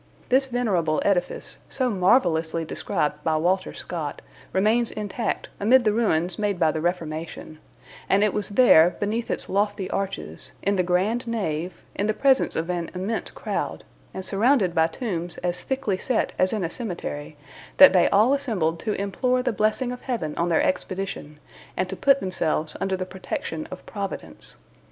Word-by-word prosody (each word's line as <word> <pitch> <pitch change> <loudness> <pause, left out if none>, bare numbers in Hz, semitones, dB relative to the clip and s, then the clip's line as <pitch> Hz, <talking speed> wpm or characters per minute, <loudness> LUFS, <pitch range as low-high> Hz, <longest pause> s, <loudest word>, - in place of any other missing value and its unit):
This 270 +2 +4
venerable 195 -11 0
edifice, 190 -3 -1
so 255 -2 0
marvelously 170 -5 +2
described 150 -1 -2
by 160 -1 +1
Walter 185 +4 +1
Scott, 155 -5 -5 0.3
remains 220 +5 +2
intact 210 +2 -3
amid 240 +5 +5
the 215 -2 +2
ruins 180 -6 +1
made 205 -3 0
by 160 - +4
the 155 - -3
Reformation; 160 -2 -4 0.5
and 200 +1 +4
it 210 - +2
was 210 0 0
there, 190 -7 +6
beneath 220 +3 -2
its - - -3
lofty 200 -1 0
arches, 80 - -4
in 200 +1 +2
the 185 - +2
grand 190 +7 0
nave, 185 -7 -3
in 205 - -1
the 215 - 0
presence 270 -1 +3
of 160 +1 -1
an 170 -2 -3
immense 200 +5 -2
crowd, - - -4 0.3
and 190 - -6
surrounded 205 -2 +2
by 160 -1 +3
tombs 175 -2 -4
as 175 0 -1
thickly 260 -8 -2
set 250 +1 0
as 185 - +3
in 215 -4 -1
a 165 - -1
cemetery, 160 -9 -5 0.4
that 280 -5 +10
they 180 -2 +5
all 215 +7 +4
assembled 200 - 0
to 215 - -2
implore 250 +6 0
the 250 - 0
blessing 215 +5 +1
of 250 - -7
Heaven 200 - -3
on 170 +1 0
their 165 - +3
expedition, 185 -5 -3 0.4
and 185 - 0
to 190 - -4
put 275 +6 +3
themselves 160 -4 -1
under 190 -1 0
the 185 - -3
protection 185 -4 -5
of 185 - -9
Providence. 200 -2 -6
190 Hz, 170 wpm, -24 LUFS, 170-225 Hz, 0.5 s, that